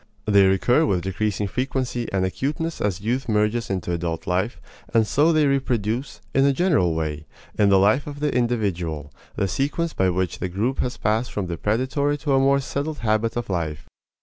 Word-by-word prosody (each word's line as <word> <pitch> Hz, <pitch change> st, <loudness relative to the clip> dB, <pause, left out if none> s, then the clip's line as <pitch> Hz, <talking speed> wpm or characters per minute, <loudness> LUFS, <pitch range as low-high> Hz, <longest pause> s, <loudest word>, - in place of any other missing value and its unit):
They 100 Hz, -2 st, +5 dB
recur 120 Hz, +10 st, +3 dB
with 90 Hz, -7 st, 0 dB
decreasing 100 Hz, +2 st, -1 dB
frequency 130 Hz, 0 st, -2 dB
and 95 Hz, -1 st, +1 dB
acuteness 150 Hz, -, -3 dB
as 100 Hz, -2 st, -1 dB
youth 120 Hz, +4 st, -1 dB
merges 105 Hz, +2 st, +1 dB
into 95 Hz, -2 st, -2 dB
adult 85 Hz, -1 st, -3 dB
life, 95 Hz, +6 st, -1 dB, 0.3 s
and 115 Hz, -1 st, +3 dB
so 150 Hz, +9 st, +3 dB
they 155 Hz, -2 st, +3 dB
reproduce, 130 Hz, -3 st, -1 dB
in 135 Hz, -, +4 dB
a 140 Hz, -, +5 dB
general 140 Hz, -, +2 dB
way, 80 Hz, -1 st, -3 dB, 0.3 s
in 105 Hz, -1 st, +3 dB
the 100 Hz, -, +6 dB
life 105 Hz, +10 st, +3 dB
of 145 Hz, -1 st, -7 dB
the 150 Hz, -1 st, 0 dB
individual, 90 Hz, -, -1 dB, 0.2 s
the 100 Hz, -, 0 dB
sequence 145 Hz, -, -1 dB
by 95 Hz, -1 st, +2 dB
which 90 Hz, -1 st, -1 dB
the 90 Hz, -, -2 dB
group 110 Hz, +9 st, -1 dB
has 125 Hz, -, -1 dB
passed 110 Hz, +4 st, 0 dB
from 100 Hz, -, -2 dB
the 85 Hz, -1 st, -3 dB
predatory 130 Hz, -, 0 dB
to 145 Hz, -1 st, -1 dB
a 135 Hz, -, +4 dB
more 140 Hz, +1 st, +4 dB
settled 145 Hz, +3 st, -3 dB
habit 110 Hz, 0 st, 0 dB
of 120 Hz, -, -3 dB
life. 80 Hz, -5 st, -3 dB
110 Hz, 190 wpm, -23 LUFS, 95-135 Hz, 0.3 s, the